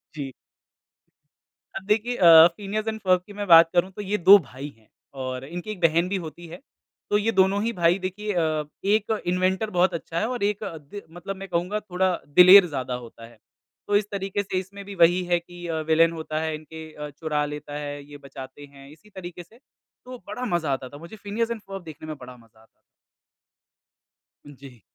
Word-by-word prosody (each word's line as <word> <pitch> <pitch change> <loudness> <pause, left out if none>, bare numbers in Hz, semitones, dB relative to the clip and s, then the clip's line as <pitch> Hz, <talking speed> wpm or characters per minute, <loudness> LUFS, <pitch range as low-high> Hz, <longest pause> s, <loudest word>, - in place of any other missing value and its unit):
जी। 140 -3 -5 1.4
अब 195 - -5
देखिए 220 +4 0
अ, 165 -2 +9
Phineas 210 +2 -4
and 220 0 -3
Ferb 185 -2 +3
की 205 - -11
मैं 205 0 -5
बात 165 -1 +8
करूँ, 180 +2 +2
तो 200 - -8
ये 205 +1 -1
2 195 +3 +8
भाई 135 0 -9
हैं, 110 -1 -27 0.3
और 130 -1 -5
इनकी 175 +7 -6
एक 210 - -7
बहन 170 +2 +3
भी 200 - -1
होती 170 +2 -10
है। 175 +3 -10 0.5
तो 205 - +3
ये 220 +2 0
दोनों 190 +1 +3
ही 230 - 0
भाई, 175 -1 +2
देखिए 200 +3 -4
अ, 160 -3 0 0.2
एक 210 +1 +2
तो 220 - 0
इन्वेंटर 185 +3 0
बहुत 180 -1 +2
अच्छा 165 0 -4
है 220 - 0
और 245 -4 -3
एक 205 0 -1
अ, 165 - -6
दे 155 +7 -11
मतलब 175 +4 -7
मैं 195 0 -8
कहूँगा, 180 +4 -1
थोड़ा 185 -2 -1 0.2
दिलेर 185 +2 +9
ज़्यादा 130 -4 -4
होता 115 -2 -9
है। 115 0 -17 0.5
तो 205 - +1
इस 205 - +3
तरीके 200 0 -2
से, 190 -1 -3
इसमें 200 +2 -9
भी 200 0 -8
वही 175 +1 +4
है 175 0 +1
कि 175 0 -12
अ, 160 -1 -2
विलेन 165 +1 +4
होता 155 -1 -4
है, 160 -1 -2
इनके 155 +1 -10
अ, 150 0 -7
चुरा 150 0 -2
लेता 150 0 -7
है, 145 -1 -6
ये 145 - -9
बचाते 135 0 -11
हैं, 140 -1 -16
इसी 160 +8 -18
तरीके 180 -3 -9
से। 220 +7 -22 0.5
तो 255 0 -8
बड़ा 250 0 -5
मज़ा 160 -4 -1
आता 130 -1 -5
था, 145 - -11
मुझे 170 +8 -11
फ़िनियस 215 +3 -3
एंड 230 -2 -4
फ़र्ब 195 -2 -9
देखने 155 -1 -10
में 155 - -5
बड़ा 125 -1 -11
मज़ा 115 -2 -23
आता - - -21
था। - - -30 1.8
हुँ, 145 - -12
जी। 130 -4 -14
175 Hz, 215 wpm, -24 LUFS, 150-200 Hz, 1.8 s, अ